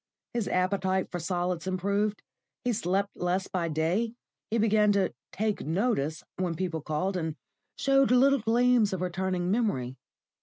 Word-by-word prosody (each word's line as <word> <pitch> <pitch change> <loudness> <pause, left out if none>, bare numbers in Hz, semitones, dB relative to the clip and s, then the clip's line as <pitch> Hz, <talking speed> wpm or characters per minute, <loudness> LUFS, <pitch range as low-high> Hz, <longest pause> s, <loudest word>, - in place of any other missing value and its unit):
His 235 -4 -1
appetite 190 0 0
for 175 - -3
solids 175 0 -2
improved, 200 +3 0 0.4
he 245 - +1
slept 200 -1 -1
less 180 +2 -1
by 175 -3 -1
day, 170 +9 0 0.3
he 230 - 0
began 215 -1 +4
to 200 -1 +1 0.2
"take 215 0 -1
notice" 160 - 0
when 180 -2 -1
people 170 -2 -2
called, 155 +6 -1
and 160 -3 -2 0.4
showed 275 0 +3
little 270 +3 +5
gleams 235 -1 +3
of 185 - -3
returning 185 0 -1
memory. 135 - 0
190 Hz, 145 wpm, -28 LUFS, 175-215 Hz, 0.4 s, little